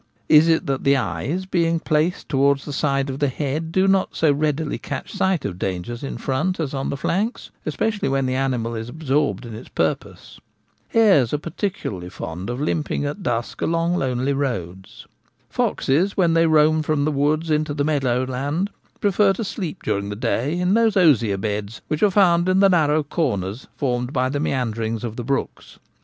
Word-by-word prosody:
Is 155 Hz, +1 st, +7 dB
it 165 Hz, -1 st, +2 dB
that 135 Hz, -1 st, -2 dB
the 140 Hz, 0 st, +4 dB
eyes, 130 Hz, -, -2 dB
being 170 Hz, -3 st, +1 dB
placed 160 Hz, +3 st, 0 dB
towards 140 Hz, 0 st, +2 dB
the 145 Hz, -, -5 dB
side 135 Hz, -1 st, 0 dB
of 135 Hz, -, -6 dB
the 145 Hz, -, +2 dB
head, 150 Hz, +4 st, -3 dB
do 190 Hz, +2 st, +2 dB
not 195 Hz, -1 st, +2 dB
so 160 Hz, -2 st, +3 dB
readily 150 Hz, +1 st, -1 dB
catch -, -, -6 dB
sight 190 Hz, -5 st, 0 dB
of 90 Hz, -3 st, -4 dB
dangers 95 Hz, +6 st, -3 dB
in 135 Hz, -, -4 dB
front 155 Hz, +8 st, -1 dB
as 150 Hz, -4 st, -2 dB
on 135 Hz, -1 st, -2 dB
the 140 Hz, -, -3 dB
flanks, 205 Hz, -, -2 dB, 0.2 s
especially 210 Hz, -8 st, -1 dB
when 135 Hz, 0 st, +1 dB
the 130 Hz, -, 0 dB
animal 130 Hz, -3 st, -1 dB
is 115 Hz, +1 st, -5 dB
absorbed 145 Hz, -2 st, -1 dB
in 115 Hz, -, -8 dB
its 110 Hz, -, -9 dB
purpose? -, -, -3 dB, 0.5 s
Hares 185 Hz, -, +4 dB
are -, -, +1 dB
peculiarly 150 Hz, -, -4 dB
fond 90 Hz, +2 st, -6 dB
of 120 Hz, +1 st, -3 dB
limping 150 Hz, 0 st, -1 dB
at 145 Hz, +8 st, -4 dB
dusk 120 Hz, -8 st, -2 dB
along 170 Hz, +1 st, +1 dB
lonely 130 Hz, -2 st, 0 dB
roads. 95 Hz, -10 st, -4 dB, 0.5 s
Foxes, 175 Hz, +9 st, +1 dB
when 175 Hz, -4 st, +3 dB
they 165 Hz, 0 st, +4 dB
roam 155 Hz, 0 st, +4 dB
from 155 Hz, -2 st, 0 dB
the 155 Hz, -, +1 dB
woods 150 Hz, +3 st, 0 dB
into 155 Hz, 0 st, +1 dB
the 145 Hz, -, 0 dB
meadow 130 Hz, -5 st, +1 dB
land, 145 Hz, -, -2 dB, 0.3 s
prefer 200 Hz, 0 st, +3 dB
to 210 Hz, -, -4 dB
sleep 190 Hz, -5 st, -5 dB
during 100 Hz, -1 st, -1 dB
the 105 Hz, -, -4 dB
day 140 Hz, +9 st, -1 dB
in 180 Hz, +2 st, +2 dB
those 225 Hz, -2 st, +3 dB
osier 120 Hz, -, +4 dB
beds 105 Hz, +2 st, -3 dB
which 155 Hz, 0 st, -1 dB
are 210 Hz, -, +5 dB
found 180 Hz, -3 st, +4 dB
in 185 Hz, +1 st, +3 dB
the 195 Hz, 0 st, +6 dB
narrow 155 Hz, -4 st, +3 dB
corners 120 Hz, -, -2 dB
formed 125 Hz, -2 st, -1 dB
by 130 Hz, -2 st, 0 dB
the 145 Hz, +2 st, -2 dB
meanderings 115 Hz, -5 st, -2 dB
of 115 Hz, -2 st, -4 dB
the 120 Hz, -, -5 dB
brooks. 135 Hz, +3 st, -3 dB
145 Hz, 190 wpm, -22 LUFS, 125-165 Hz, 0.5 s, Is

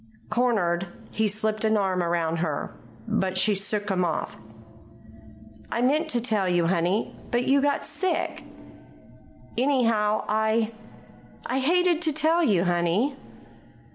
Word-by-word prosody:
Cornered, 195 Hz, -7 st, +1 dB, 0.2 s
he 220 Hz, 0 st, +1 dB
slipped 215 Hz, +1 st, -1 dB
an 220 Hz, 0 st, +3 dB
arm 190 Hz, -3 st, 0 dB
around 170 Hz, -1 st, 0 dB
her. 155 Hz, -3 st, -3 dB, 0.3 s
But 185 Hz, -1 st, -1 dB
she 210 Hz, +3 st, +3 dB
shook 205 Hz, +1 st, -1 dB
him 180 Hz, -1 st, +1 dB
off. 165 Hz, -3 st, -2 dB, 1.4 s
"I 235 Hz, -, 0 dB
meant 305 Hz, +5 st, +2 dB
to 245 Hz, -, +2 dB
tell 215 Hz, -5 st, 0 dB
you, 175 Hz, -1 st, +2 dB
honey; 175 Hz, +4 st, 0 dB
but 240 Hz, 0 st, +1 dB
you 275 Hz, +2 st, +3 dB
got 285 Hz, 0 st, 0 dB
sick. 375 Hz, -1 st, -2 dB, 1.1 s
Anyhow, 230 Hz, -5 st, +1 dB
I 220 Hz, +1 st, +1 dB, 0.7 s
I 260 Hz, -, -1 dB
hated 345 Hz, +4 st, +2 dB
to 320 Hz, -3 st, +1 dB
tell 315 Hz, +3 st, +2 dB
you, 195 Hz, -, +3 dB
honey." 175 Hz, +9 st, +1 dB
215 Hz, 130 wpm, -25 LUFS, 185-255 Hz, 1.4 s, an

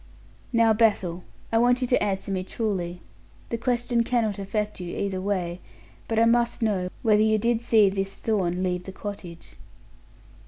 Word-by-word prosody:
"Now, 230 Hz, -2 st, +4 dB
Bethel, 195 Hz, -6 st, +1 dB, 0.3 s
I 225 Hz, -, +3 dB
want 245 Hz, +1 st, +4 dB
you 250 Hz, -, -1 dB
to 255 Hz, -, +3 dB
answer 195 Hz, 0 st, -2 dB
me 185 Hz, -1 st, -1 dB
truly. 185 Hz, -4 st, -3 dB, 0.5 s
The 230 Hz, -, -2 dB
question 240 Hz, -1 st, +1 dB
cannot 225 Hz, -4 st, 0 dB
affect 210 Hz, +1 st, -3 dB
you 175 Hz, -1 st, -5 dB
either 195 Hz, -2 st, -2 dB
way, 185 Hz, -3 st, -2 dB, 0.5 s
but 225 Hz, -, -1 dB
I 225 Hz, -, +5 dB
must 235 Hz, 0 st, +2 dB
know 190 Hz, -5 st, 0 dB
whether 215 Hz, -2 st, +4 dB
you 220 Hz, 0 st, +3 dB
did 230 Hz, +1 st, +1 dB
see 220 Hz, -3 st, +5 dB
this 195 Hz, 0 st, -1 dB
Thorn 185 Hz, -5 st, -1 dB
leave 180 Hz, -1 st, -1 dB
the 190 Hz, -, -6 dB
cottage." 185 Hz, -5 st, -8 dB
210 Hz, 165 wpm, -25 LUFS, 185-230 Hz, 0.5 s, I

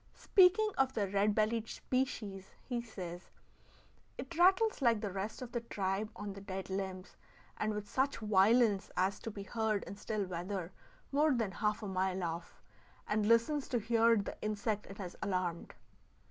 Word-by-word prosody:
Speaking 400 Hz, +3 st, +5 dB
of 270 Hz, -1 st, +2 dB
the 205 Hz, -3 st, +1 dB
red 200 Hz, +2 st, +2 dB
bellied 220 Hz, +1 st, +1 dB
species, 210 Hz, -7 st, -3 dB
he 245 Hz, -2 st, -2 dB
says: 180 Hz, -6 st, -8 dB, 0.9 s
"It 340 Hz, -, -7 dB
rattles 380 Hz, +3 st, +4 dB
like 235 Hz, -4 st, +4 dB
the 205 Hz, -2 st, -3 dB
rest 200 Hz, +6 st, -4 dB
of 245 Hz, -, -8 dB
the 240 Hz, -, -2 dB
tribe 200 Hz, -1 st, -2 dB
on 205 Hz, 0 st, -5 dB
the 195 Hz, -, -9 dB
dead 190 Hz, -1 st, -5 dB
limbs, 190 Hz, -1 st, -4 dB, 0.4 s
and 215 Hz, -, 0 dB
with 210 Hz, -1 st, -5 dB
such 265 Hz, +5 st, 0 dB
violence 210 Hz, 0 st, +4 dB
as 190 Hz, +2 st, +1 dB
to -, -, -5 dB
be 200 Hz, -2 st, -7 dB
heard 220 Hz, -1 st, -1 dB
in -, -, -8 dB
still 210 Hz, -1 st, -2 dB
weather 180 Hz, 0 st, -4 dB, 0.4 s
more 295 Hz, 0 st, +3 dB
than 225 Hz, -5 st, 0 dB
half 210 Hz, +2 st, -1 dB
a -, -, -3 dB
mile 190 Hz, -1 st, -1 dB
off; 170 Hz, 0 st, -5 dB, 0.4 s
and 210 Hz, 0 st, +1 dB
listens 235 Hz, +6 st, +3 dB
to 245 Hz, -, 0 dB
hear 230 Hz, +1 st, +4 dB
the 200 Hz, -, -3 dB
insect 215 Hz, 0 st, -2 dB
it 195 Hz, -, -10 dB
has 180 Hz, -3 st, -6 dB
alarmed." 185 Hz, -4 st, -2 dB
210 Hz, 170 wpm, -34 LUFS, 190-235 Hz, 0.9 s, Speaking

